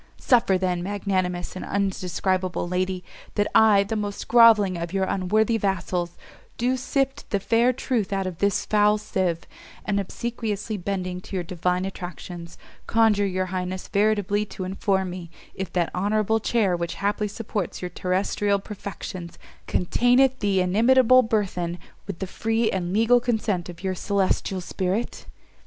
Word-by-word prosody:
Suffer 230 -7 +3
then, 180 -1 -1
magnanimous 185 -2 -2
and 185 - -5
undescribable 185 -2 -1
lady! 185 0 -1 0.3
that 205 - +2
I, 210 -3 +6
the 205 +3 -3
most 205 -1 -4
groveling 225 -5 +6
of 170 -1 -4
your 195 -1 +1
unworthy 215 +5 +1
vassals, 180 -3 -2 0.4
do 250 +2 +1
sift 270 +2 -2
the 200 - 0
fair 230 +5 +3
truth 235 -5 -2
out 195 -1 -1
of 180 -3 -5
this 200 0 +1
foul 210 0 +3
sieve, 185 -5 -1 0.4
and 200 -1 0
obsequiously 215 +1 -3
bending 185 -1 -3
to 195 - -8
your 180 - -1
divine 180 +1 -1
attractions, 175 -2 -7 0.3
conjure 220 -3 +3
your 185 0 -1
highness 185 0 -3
veritably 205 0 +1
to 190 - -6
inform 190 0 -1
me, 175 -2 -7 0.2
if 190 -2 -5
that 175 -2 0
honourable 215 +3 +1
chair 215 -5 +1
which 170 -1 -3
haply 205 +1 -1
supports 210 -3 -4
your 180 - -2
terrestrial 195 +3 0
perfections, 195 -3 -7 0.3
containeth 245 +7 +3
the 200 -3 +2
inimitable 245 +7 +5
burthen 195 -7 -1 0.3
with 195 -4 -5
the 190 - -3
free 225 +4 0
and 180 -2 -2
legal 225 +4 +4
consent 220 -7 -1
of 175 +1 -10
your 190 -1 0
celestial 190 0 0
spirit?" 190 +5 -3
195 Hz, 145 wpm, -24 LUFS, 185-215 Hz, 0.4 s, I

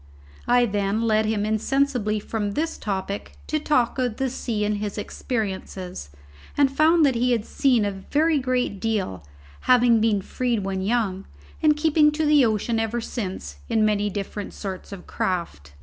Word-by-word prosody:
I 245 0 +5
then 205 0 0
led 215 -1 +2
him 215 -1 0
insensibly 220 0 0
from 210 -1 -3
this 320 +6 -1
topic 200 0 -4
to 310 - -1
talk 265 -4 +1
of 245 -4 -1
the 265 -2 -1
sea 220 -5 -2
and 210 0 0
his 205 0 -4
experiences, 190 - -4 0.5
and 275 -1 +3
found 315 +1 +5
that 270 - +3
he 245 +1 +2
had 225 -2 -1
seen 250 -6 +2
a 205 - 0
very 295 +11 +1
great 250 -6 -1
deal, 195 - -2 0.5
having 240 -3 +5
been 210 -3 +2
freed 240 -3 -1
when 190 -1 -2
young, 200 -2 -1 0.3
and 300 -1 +4
keeping 300 -1 +4
to 310 +1 0
the 295 -2 +5
ocean 225 0 +1
ever 225 +1 -1
since 210 -5 -5
in 220 -2 +3
many 210 -1 +1
different 200 +1 -5
sorts 190 -2 -6
of 195 -3 -8
craft. 170 - -3
220 Hz, 165 wpm, -24 LUFS, 205-255 Hz, 0.5 s, I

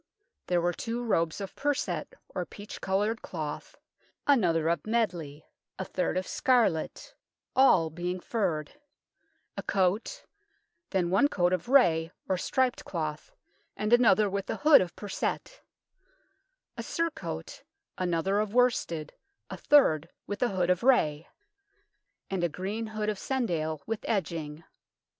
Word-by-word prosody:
There 175 -1 +2
were 175 +1 +1
two 235 +6 -4
robes 165 -8 0
of 195 - -6
perset, 290 -1 -2
or - - -3
peach 205 +1 -10
coloured 205 +4 0
cloth, 155 -4 -6 0.5
another 175 - +3
of 170 +2 0
medley, 175 -10 -1 0.3
a 190 - -3
third 180 0 -1
of 185 - -1
scarlet, 240 - +1 0.4
all 185 -12 +5
being 175 +3 -3
furred; 175 -8 -2 0.8
a - - -4
coat, 200 - 0 0.6
then 180 -3 0
one 200 +10 +5
coat 180 -8 +1
of 185 +5 -2
ray, 165 -12 +4 0.2
or 190 - +1
striped 255 +7 0
cloth, 155 - -4 0.5
and 210 +2 0
another 215 -4 +5
with 195 0 -3
a - - -1
hood 300 0 +6
of 175 -2 -4
perset; 215 - -4 1.1
a - - -5
surcoat, 330 -1 -4 0.3
another 185 +2 0
of 215 +1 -2
worsted, 195 -11 +1 0.4
a - - -5
third 165 - +4 0.2
with 205 - -5
a 245 - +3
hood 185 -2 +1
of 180 - +1
ray; 165 - +3 1.0
and 190 -2 -2
a 175 - +2
green 200 +7 -4
hood 215 -1 -3
of 210 -2 -3
cendale, 160 - -2
with 225 -1 -2
edging. 165 -6 -2
190 Hz, 135 wpm, -29 LUFS, 165-230 Hz, 1.1 s, hood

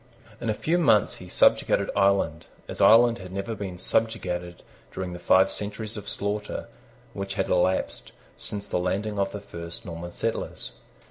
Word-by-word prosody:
In 115 - -2
a 110 - +1
few 170 +9 +1
months 110 -11 +4
he 90 - -11
subjugated - - +3
Ireland, 95 -5 +2 0.2
as - - -5
Ireland 115 +1 +7
had 95 -1 -9
never 100 +4 -3
been 95 -4 -5
subjugated 90 -4 -1 0.3
during 90 -1 -4
the 90 - -7
five 95 +2 +4
centuries 105 +1 -4
of 100 -2 -6
slaughter 105 +1 -3 0.5
which 100 0 -4
had 95 - -1
elapsed 90 -9 +1 0.2
since 100 -1 -5
the - - 0
landing 100 +3 -1
of 100 0 +1
the 105 - -5
first 85 -4 -8
Norman 85 +1 -6
settlers. - - -3
100 Hz, 160 wpm, -26 LUFS, 90-105 Hz, 0.5 s, Ireland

